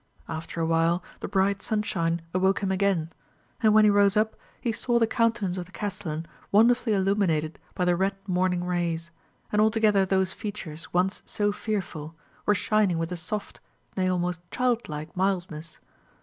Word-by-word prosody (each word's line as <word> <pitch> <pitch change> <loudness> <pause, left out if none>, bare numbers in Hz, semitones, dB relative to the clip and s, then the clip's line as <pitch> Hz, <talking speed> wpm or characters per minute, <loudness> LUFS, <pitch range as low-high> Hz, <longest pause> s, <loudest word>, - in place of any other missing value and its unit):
After 165 +1 -5
a 165 - +1
while 165 +2 +2 0.2
the - - -4
bright 195 0 +1
sunshine 170 -6 -1
awoke 190 +2 +2
him 190 - +1
again; 190 -4 +1 0.5
and 220 - +5
when 215 0 +6
he 210 - +6
rose 200 0 +4
up, 220 +1 +2 0.2
he 235 - -1
saw 240 +2 0
the 230 - +4
countenance 225 -5 0
of 175 - -6
the - - -18
castellan 170 -6 -4 0.3
wonderfully 230 +2 +4
illuminated 190 -6 +1 0.2
by 180 - 0
the 175 0 +3
red 195 +2 0
morning 180 -1 +1
rays; 170 -2 -2 0.4
and 210 - +3
altogether 215 -2 +4
those 190 0 +1
features, 180 -7 -6
once 185 +3 +1
so 205 0 +1
fearful, 180 -7 -4 0.3
were 210 - +5
shining 205 -3 +2
with 165 +1 -2
a - - -2
soft, 190 +5 -5 0.4
nay 185 -1 +1
almost 180 -1 -1
child 245 -4 0
like 155 +2 -6
mildness. 175 -4 -2
190 Hz, 165 wpm, -26 LUFS, 170-210 Hz, 0.5 s, when